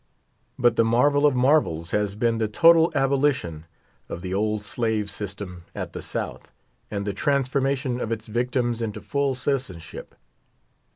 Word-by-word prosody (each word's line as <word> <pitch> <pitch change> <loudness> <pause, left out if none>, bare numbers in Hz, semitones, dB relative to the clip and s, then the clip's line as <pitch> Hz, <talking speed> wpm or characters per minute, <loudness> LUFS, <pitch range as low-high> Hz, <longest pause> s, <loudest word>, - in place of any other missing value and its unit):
But 120 -2 +3
the - - +5
marvel 145 +6 +4
of 140 - +1
marvels 125 - +2
has 105 -1 0
been 115 +1 +1
the 110 - +1
total 165 +8 +5
abolition 135 - +1 0.4
of 85 - -6
the 90 0 -3
old 105 +1 0
slave 105 +1 -1
system 95 -3 -6
at - - -5
the - - -6
South, - - -5 0.4
and 100 -1 -3
the 100 - -2
transformation 135 +1 0
of 115 - -3
its 110 -1 -3
victims 120 +1 -1
into 110 -2 -3
full 140 -2 -1
citizenship. 125 - -4
115 Hz, 150 wpm, -24 LUFS, 105-135 Hz, 0.4 s, the